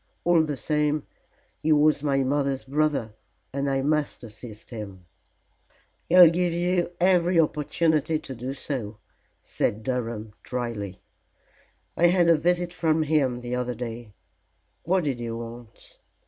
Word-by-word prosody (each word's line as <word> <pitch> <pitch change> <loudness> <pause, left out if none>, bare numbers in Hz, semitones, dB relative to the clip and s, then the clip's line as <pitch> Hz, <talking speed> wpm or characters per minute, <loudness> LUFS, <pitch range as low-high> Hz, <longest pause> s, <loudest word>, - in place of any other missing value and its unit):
All 175 -1 +4
the 150 -3 -2
same 150 +3 0 0.6
he 155 - +1
was 150 -1 +4
my 140 -2 +1
mother's 140 0 0
brother, 140 -5 0 0.4
and 140 0 -1
I 135 0 0
must 150 -2 -1
assist 110 0 -11
him." 100 -5 -8 1.0
"He'll 175 -1 +9
give 175 0 0
you 175 0 0
every 180 -1 +3
opportunity 155 0 +1
to 135 - -8
do 125 +2 -5
so," 120 -7 -4 0.5
said 110 +2 -2
Durham, 115 -4 -3
dryly. 115 -6 -5 0.9
"I 175 - +4
had 175 -1 +3
a 165 - +7
visit 175 +2 0
from 160 -2 +1
him 140 -5 +1
the 120 0 -5
other 125 0 -2
day?" 115 -3 -7 0.7
"What 185 +1 +2
did 135 -5 -2
he 120 -1 -4
want?" 115 0 -9
140 Hz, 135 wpm, -25 LUFS, 120-160 Hz, 1.0 s, He'll